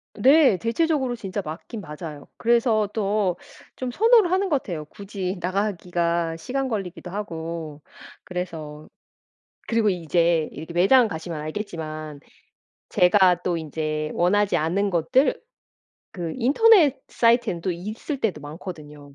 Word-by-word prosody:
네. 265 Hz, -1 st, +5 dB
대체적으로 260 Hz, -, 0 dB
진짜 200 Hz, -2 st, -4 dB
맞긴 180 Hz, +8 st, -7 dB
맞아요. 150 Hz, -2 st, -8 dB
그래서 230 Hz, -2 st, +2 dB
또 200 Hz, -4 st, 0 dB, 0.4 s
좀 255 Hz, -1 st, -4 dB
선호를 440 Hz, -, +4 dB
하는 380 Hz, +1 st, +1 dB
것 285 Hz, -4 st, +1 dB
같아요. 160 Hz, -5 st, -5 dB
굳이 195 Hz, +2 st, -5 dB
나가기가 175 Hz, -3 st, -1 dB
시간 265 Hz, +10 st, -2 dB
걸리기도 190 Hz, -5 st, -5 dB
하고 165 Hz, -6 st, -5 dB, 0.4 s
그래서. 160 Hz, -4 st, -6 dB, 0.8 s
그리고 225 Hz, -2 st, +2 dB
이제 170 Hz, -2 st, +1 dB
이렇게 160 Hz, +3 st, -8 dB
매장 225 Hz, +8 st, +5 dB
가시면 160 Hz, -3 st, -5 dB
알겠지만 155 Hz, -3 st, -6 dB, 0.7 s
제가 180 Hz, -1 st, +4 dB
또 175 Hz, -2 st, 0 dB
인제 155 Hz, -1 st, -3 dB
원하지 200 Hz, +4 st, +2 dB
않는 190 Hz, +6 st, +1 dB
것들 250 Hz, -, +2 dB, 0.7 s
그 170 Hz, -3 st, -5 dB
인터넷 295 Hz, -, +5 dB
사이트에는 230 Hz, -7 st, +2 dB
또 185 Hz, -, -2 dB
있을 215 Hz, -, -5 dB
때도 190 Hz, -9 st, -1 dB
많거든요. 150 Hz, -2 st, -9 dB
180 Hz, 285 characters per minute, -24 LUFS, 160-230 Hz, 0.8 s, 네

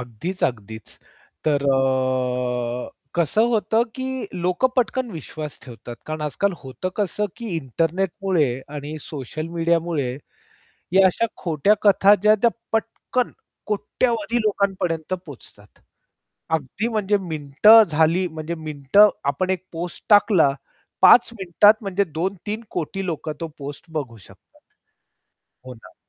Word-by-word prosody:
अगदीच, 125 Hz, -, -6 dB
अगदीच. 110 Hz, -3 st, -4 dB, 0.6 s
तर 145 Hz, -2 st, +1 dB
अ, 125 Hz, -2 st, -1 dB, 0.3 s
कसं 175 Hz, +7 st, +2 dB
होतं 225 Hz, +1 st, +2 dB
की 260 Hz, -, -3 dB, 0.4 s
लोकं 180 Hz, +8 st, +2 dB
पटकन 250 Hz, 0 st, 0 dB
विश्वास 155 Hz, -3 st, -7 dB
ठेवतात. 120 Hz, -2 st, -10 dB
कारण 155 Hz, 0 st, -4 dB
आजकाल 195 Hz, +7 st, -1 dB
होतं 130 Hz, +7 st, -5 dB
कसं 210 Hz, 0 st, -1 dB
की 235 Hz, -, -7 dB
इंटरनेटमुळे 165 Hz, -, 0 dB, 0.3 s
आणि 145 Hz, +2 st, -6 dB
सोशल 155 Hz, +2 st, -6 dB
मीडियामुळे 165 Hz, -5 st, 0 dB, 0.8 s
या 190 Hz, 0 st, +6 dB
अशा 210 Hz, +5 st, +1 dB
खोट्या 170 Hz, +4 st, +2 dB
कथा 200 Hz, 0 st, +6 dB
ज्या 215 Hz, +1 st, +6 dB
त्या 235 Hz, -, +5 dB, 0.2 s
पटकन 230 Hz, +2 st, -1 dB, 0.4 s
कोट्यावधी 235 Hz, +5 st, -1 dB
लोकांपर्यंत 190 Hz, -5 st, -1 dB
पोहचतात. 105 Hz, -7 st, -14 dB, 0.8 s
अगदी 160 Hz, -, -2 dB
म्हणजे 210 Hz, -3 st, +1 dB
मिनिटं 165 Hz, +5 st, +5 dB
झाली 160 Hz, +4 st, +2 dB
म्हणजे 160 Hz, +1 st, -5 dB
मिनिटं 155 Hz, +5 st, +3 dB, 0.2 s
आपण 185 Hz, +6 st, -2 dB
1 185 Hz, -1 st, -2 dB
पोस्ट 170 Hz, +1 st, -6 dB
टाकला 195 Hz, -8 st, +5 dB, 0.5 s
5 245 Hz, -, +8 dB
मिनिटात 190 Hz, +4 st, +5 dB
म्हणजे 200 Hz, 0 st, 0 dB
2-3 190 Hz, +6 st, -4 dB
कोटी 185 Hz, +3 st, -4 dB
लोकं 160 Hz, -2 st, -3 dB
तो 165 Hz, -, -3 dB
पोस्ट 145 Hz, 0 st, -8 dB
बघू 135 Hz, -7 st, -4 dB
शकतात. 95 Hz, -, -20 dB, 1.1 s
हो 130 Hz, -, -8 dB
ना. 115 Hz, -, -17 dB
165 Hz, 120 wpm, -22 LUFS, 140-200 Hz, 1.1 s, 5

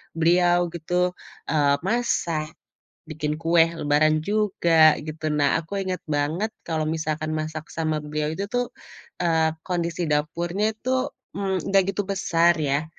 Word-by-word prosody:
beliau 175 Hz, +1 st, +3 dB
gitu, 180 Hz, +2 st, 0 dB, 0.4 s
eee, 145 Hz, -3 st, +3 dB
masak 170 Hz, -9 st, -1 dB, 0.5 s
bikin 150 Hz, -1 st, -2 dB
kue 165 Hz, 0 st, +5 dB
lebaran 155 Hz, +1 st, +3 dB
juga, 170 Hz, -6 st, +4 dB
gitu. 155 Hz, +1 st, -5 dB
Nah, 145 Hz, -1 st, +2 dB
aku 195 Hz, +5 st, -4 dB
inget 185 Hz, -2 st, -3 dB
banget 155 Hz, +8 st, -1 dB
kalau 160 Hz, -2 st, -2 dB
misalkan 155 Hz, 0 st, -2 dB
masak 155 Hz, 0 st, -4 dB
sama 155 Hz, -1 st, -1 dB
beliau 150 Hz, 0 st, -3 dB
itu 195 Hz, +4 st, -3 dB
tuh, 245 Hz, +3 st, -1 dB, 0.5 s
eee, 160 Hz, -2 st, +2 dB, 0.2 s
kondisi 170 Hz, -1 st, -1 dB
dapurnya 170 Hz, +8 st, 0 dB
itu, 260 Hz, +4 st, -1 dB, 0.3 s
mmm, 190 Hz, -3 st, -2 dB
nggak 195 Hz, -1 st, +6 dB
gitu 205 Hz, -, 0 dB
besar 175 Hz, -3 st, +3 dB
ya, 145 Hz, +2 st, 0 dB
165 Hz, 135 wpm, -24 LUFS, 155-180 Hz, 0.5 s, nggak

